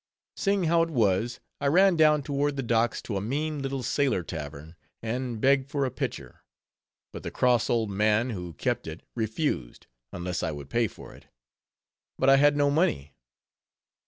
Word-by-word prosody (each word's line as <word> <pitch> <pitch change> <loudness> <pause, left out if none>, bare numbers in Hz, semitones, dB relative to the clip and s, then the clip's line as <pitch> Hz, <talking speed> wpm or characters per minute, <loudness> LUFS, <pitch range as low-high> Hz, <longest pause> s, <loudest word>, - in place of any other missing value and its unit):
Seeing 200 -1 +1
how 170 0 +3
it 165 - 0
was, 115 - +1 0.2
I 140 - 0
ran 185 +5 +5
down 155 -2 +4
toward 145 +1 -1
the 135 - -2
docks 115 -1 +1
to 105 - -3
a - - -2
mean 145 +7 -2
little 135 -1 -3
sailor 130 -11 +1
tavern, 75 0 -7 0.2
and 120 0 -3
begged 135 +2 +3
for 140 -1 0
a 130 - -2
pitcher; 115 - -5 0.7
but - - -7
the - - -5
cross 125 -3 +2
old 115 -3 +1
man 105 +4 +2
who 90 -5 -6
kept 70 - -2
it 80 +1 -7
refused, 110 - -2 0.3
unless 90 0 -3
I - - -1
would 70 -1 -9
pay 115 -1 +2
for - - -12
it. - - -17 0.9
But 135 +1 +4
I 135 - +7
had 145 +1 +4
no 145 -1 +3
money. 75 - 0
125 Hz, 175 wpm, -27 LUFS, 100-145 Hz, 0.9 s, I